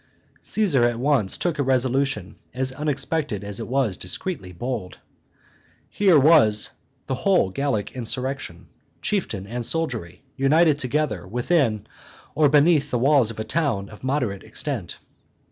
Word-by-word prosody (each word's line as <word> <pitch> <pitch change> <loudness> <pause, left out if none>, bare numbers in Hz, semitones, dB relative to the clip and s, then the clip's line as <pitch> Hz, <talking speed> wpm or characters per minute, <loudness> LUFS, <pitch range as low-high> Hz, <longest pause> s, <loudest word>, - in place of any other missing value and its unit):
Caesar 180 - +1
at 120 -1 +2
once 130 -7 +1
took 170 -4 -2
a - - +3
resolution 130 -5 0 0.2
as 130 0 0
unexpected 145 -5 -2
as 100 +1 -5
it 115 - -5
was 125 -7 0
discreetly 95 - -5
bold. 110 0 -5 0.9
Here 190 -6 +4
was 135 -8 +5 0.3
the 135 - -3
whole 135 - +2
Gallic 135 -3 -1
insurrection, 125 -5 -4 0.4
chieftain 170 - -2
and 120 +4 -4
soldiery, 115 - -3
united 150 +2 +3
together 145 -6 -1
within 120 - +1 0.5
or 150 -2 +4
beneath 150 0 +4
the 125 - 0
walls 135 -2 +4
of 115 - -6
a - - -1
town 110 -9 -1
of 105 - -14
moderate 125 -8 -1
extent. - - -4
130 Hz, 135 wpm, -23 LUFS, 110-150 Hz, 0.9 s, was